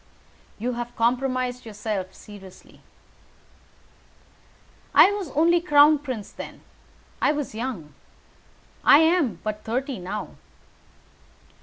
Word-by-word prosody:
"You 240 +4 -2
have 240 0 -6
compromised 250 +1 0
yourself 210 -3 -5
seriously." 195 -3 -14 2.1
"I 395 - +8
was 405 -6 -4
only 335 +3 +4
crown 295 -2 +5
prince 255 -8 -6
then. - - -10 0.6
I - - +3
was 295 -5 -4
young. 215 - -5 0.9
I - - +8
am 320 - +3
but 215 0 -4
thirty 255 +2 -3
now." 195 +4 -6
250 Hz, 100 wpm, -24 LUFS, 210-290 Hz, 2.1 s, I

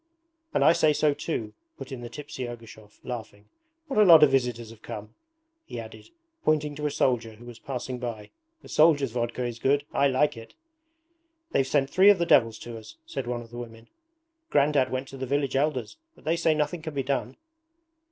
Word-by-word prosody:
'And - - +2
I 165 - +7
say 155 -2 +3
so 150 0 +2
too,' 115 -8 -4 0.2
put - - -9
in 130 -2 -6
the 120 - -7
tipsy 145 -1 -6
Ergushov, 110 -3 -12
laughing. 110 -4 -7 0.4
'What 270 -8 -1
a - - +8
lot 165 -5 +9
of 145 - +6
visitors 120 -4 0
have 110 -1 -15
come,' 105 +1 -8 0.5
he - - -7
added, - - -10 0.3
pointing 150 -1 +1
to 150 +1 -3
a - - 0
soldier 120 -5 0
who 120 +3 -15
was 120 -1 -11
passing 130 -2 -5
by. 115 -4 -6 0.3
'The - - -13
soldiers' 150 -5 +4
vodka 120 +1 -2
is 120 -1 -5
good 140 +3 +2
I 140 - +3
like 135 +2 +2
it.' 115 0 -12 1.0
'They've 135 - +2
sent 135 -1 +1
three 190 +2 +6
of 205 - +6
the 170 - 0
devils 115 -8 +4
to 115 -1 -7
us,' 110 0 -13
said 135 -3 -5
one 120 -1 -2
of 115 - -17
the 120 - -9
women. 115 -1 -10 0.6
'Grandad 140 -2 +3
went 130 +1 -3
to 135 - -9
the 130 0 -4
village 140 0 0
Elders, 140 - -1 0.2
but - - -20
they 160 +2 +1
say 165 -2 +2
nothing 150 +2 -1
can 155 -2 -7
be 135 - 0
done.' 140 +1 -2
130 Hz, 205 wpm, -27 LUFS, 120-150 Hz, 1.0 s, lot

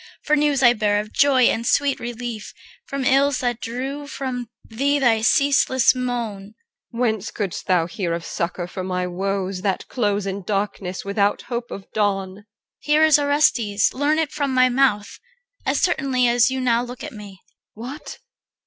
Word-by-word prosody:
For 305 - +2
news 290 -2 +1
I 240 -1 +7
bear 210 -2 +1
of 215 +1 -7
joy 275 -3 +4
and 230 -1 +2
sweet 280 +3 +1
relief 240 -2 -6 0.3
From 275 -1 -3
ills 275 +1 +3
that 245 -2 -2
drew 270 +5 -5
from 255 -4 -4 0.2
thee 280 +6 0
thy 235 -5 +3
ceaseless 270 +1 +3
moan. 230 -5 -4 0.4
EL. 235 - -8
Whence 220 -4 0
couldst 200 -5 -5
thou 180 -3 +3
hear 175 +1 -4
of 170 0 -6
succour 170 +1 -3
for 185 +1 -6
my 180 -1 -2
woes, 190 +1 -3
That 195 -2 -2
close 205 -4 -1
in 195 0 -4
darkness 195 -1 -3
without 200 0 0
hope 240 -1 -5
of 195 - -8
dawn? 195 -3 -1
CHR. 205 - -16 0.4
Here 300 +1 +2
is 310 -2 +6
Orestes, 270 -8 +2
learn 290 +3 +1
it 320 -3 0
from 280 -3 -2
my 255 0 +5
mouth, 245 -5 +1 0.5
As - - +1
certainly 270 -8 +1
as 240 +1 +4
you 260 0 -2
now 240 -2 +2
look 245 0 -8
on - - -7
me. 205 -2 -10 0.4
EL. 225 - -8
What? 275 +5 -8
235 Hz, 175 wpm, -22 LUFS, 200-270 Hz, 0.5 s, I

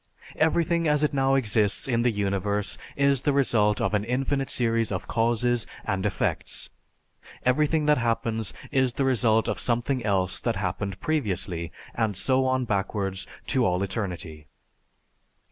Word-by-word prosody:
Everything 165 +1 +2
as 150 0 +2
it 150 - +1
now 135 0 +2
exists 105 -4 +1
in 120 -3 +1
the 120 - +3
universe 100 -1 -1 0.2
is 140 -2 +3
the 145 - +2
result 110 -6 +2
of - - 0
an 105 -1 +1
infinite 135 +3 -1
series 115 -2 +1
of 90 - -3
causes 120 +1 +1 0.2
and 95 -1 -1
effects. 100 - -2 0.7
Everything 150 +4 +2
that 150 -2 +4
happens 115 -2 -1 0.2
is 130 -3 +2
the 135 - 0
result 115 -4 +2
of - - -2
something 120 +1 0
else 95 -3 0
that 115 -2 0
happened 95 +1 -3
previously 95 - -1 0.2
and 110 -4 -1
so 130 +4 +2
on 130 -1 +1
backwards 95 -2 -2 0.2
to 130 - +1
all 90 -2 +1
eternity. 90 -7 -4
115 Hz, 145 wpm, -26 LUFS, 100-135 Hz, 0.7 s, that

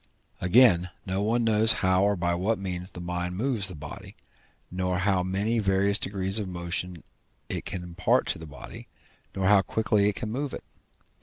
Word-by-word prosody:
Again, 90 -2 +4 0.2
no 95 +1 -2
one 115 +3 +1
knows 110 0 +7
how 95 0 +3
or 100 0 +2
by 85 -1 -1
what 100 +6 0
means 90 -1 -4
the 90 - -10
mind 90 +1 -4
moves 115 -4 +1
the 95 - -3
body, 75 -1 -10 0.6
nor 90 0 -1
how 95 0 +1
many 100 +5 -1
various 100 0 +1
degrees 95 +1 -1
of 105 - -4
motion 85 -1 -5 0.5
it - - -4
can 90 -1 -5
impart 90 +1 0
to - - -1
the 80 - -9
body, 70 -3 -11 0.5
nor 95 - -1
how 100 0 +5
quickly 105 0 +1
it 105 - -4
can 105 - -4
move 140 +3 -3
it. - - -9
95 Hz, 180 wpm, -26 LUFS, 90-105 Hz, 0.6 s, knows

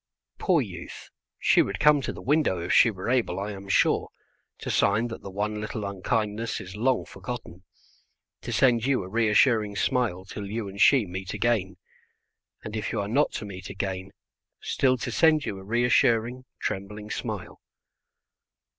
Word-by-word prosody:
Poor - - +3
youth, - - -9 0.3
she - - +4
would - - -2
come 150 -1 +5
to - - -3
the - - -10
window 145 - +2
if 85 - -1
she - - +7
were 95 -4 -6
able, 120 -7 +1
I 100 +2 -3
am 100 -1 -9
sure, - - +2 0.5
to - - -4
sign 110 +4 +2
that 115 - -7
the 100 - -8
one 105 +2 -3
little 110 -1 -4
unkindness 105 +3 -2
is 95 +1 -9
long 125 +4 +1
forgotten, 115 -8 -8 0.8
to - - -6
send 120 0 +3
you 135 -7 +1
a - - -8
reassuring 110 0 +3
smile 110 -7 0
till 100 +1 -7
you 110 0 -3
and 100 +1 -6
she 135 -6 +6
meet 95 +2 -6
again; 100 -4 0 0.9
and, 105 - -6
if 105 -3 -3
you 110 - -1
are 100 - -2
not 140 +8 +2
to 105 - -4
meet 95 -2 -8
again, 95 -1 -4 0.5
still 130 -1 +1
to 120 0 -4
send 155 +3 +4
you 100 - -4
a - - -11
reassuring, 120 +2 +2
trembling 105 +2 -4
smile. - - -5
105 Hz, 170 wpm, -26 LUFS, 100-120 Hz, 0.9 s, she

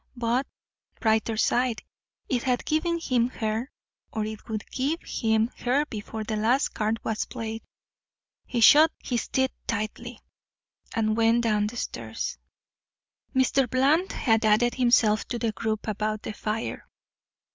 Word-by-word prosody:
But, 240 +2 0 0.5
brighter 220 0 +1
side, 240 0 +1 0.4
it 250 -2 0
had 250 -1 0
given 335 +2 0
him 245 -6 +1
her 225 +1 -2 0.4
or 215 -1 -2
it 215 +1 -8
would 215 -2 -3
give 285 +6 -1
him 220 +1 +1
her 270 +4 +1
before 220 -3 -6
the 215 0 -3
last 240 +6 +2
card 220 +1 -1
was 220 -2 -1
played. 225 -2 -5 0.9
He 240 - -1
shut 305 +7 +8
his 240 -2 -2
teeth 265 0 +1 0.2
tightly, 225 +2 -4 0.8
and 215 -1 +1
went 230 +1 +3
down 210 -2 +2
the 235 +3 -7
stairs. - - -4 1.0
Mr. 260 0 +3
Bland 285 - +2
had 225 -2 +1
added 220 +3 +4
himself 235 -4 +3
to 240 - -3
the 230 -1 0
group 215 +1 -3
about 215 0 -2
the - - -5
fire. 215 +2 -4
230 Hz, 140 wpm, -26 LUFS, 220-255 Hz, 1.0 s, shut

